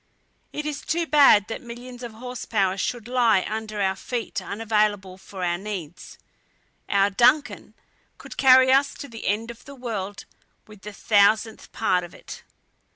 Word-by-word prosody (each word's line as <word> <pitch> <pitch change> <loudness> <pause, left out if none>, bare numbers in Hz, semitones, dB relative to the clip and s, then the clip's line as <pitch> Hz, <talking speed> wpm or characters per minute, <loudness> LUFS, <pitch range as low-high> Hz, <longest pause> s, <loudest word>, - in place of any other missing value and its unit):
It 300 - -5
is 300 -2 -4
too 335 +1 -1
bad 280 -10 +5
that 225 - -6
millions 245 +1 -10
of 240 -2 -7
horse 250 +2 -7
power 195 -4 0
should 230 +4 -3
lie 235 -6 +2
under 215 -1 -5
our 190 -1 +1
feet 235 +4 -4
unavailable 210 -3 -1
for 190 -1 -8
our 175 0 -1
needs. 190 -5 -8 0.7
Our 200 0 +3
DUNCAN 250 +8 +2 0.5
would - - -10
carry 260 -1 +6
us 275 +1 +3
to 285 - -8
the 225 -3 -8
end 220 +4 -1
of 235 - -16
the 280 - -11
world 210 -6 -5 0.4
with 210 -2 -16
the 210 +2 -8
thousandth 215 +2 +2
part 185 -5 0
of 175 - -11
it." - - -11
220 Hz, 160 wpm, -24 LUFS, 200-250 Hz, 0.7 s, carry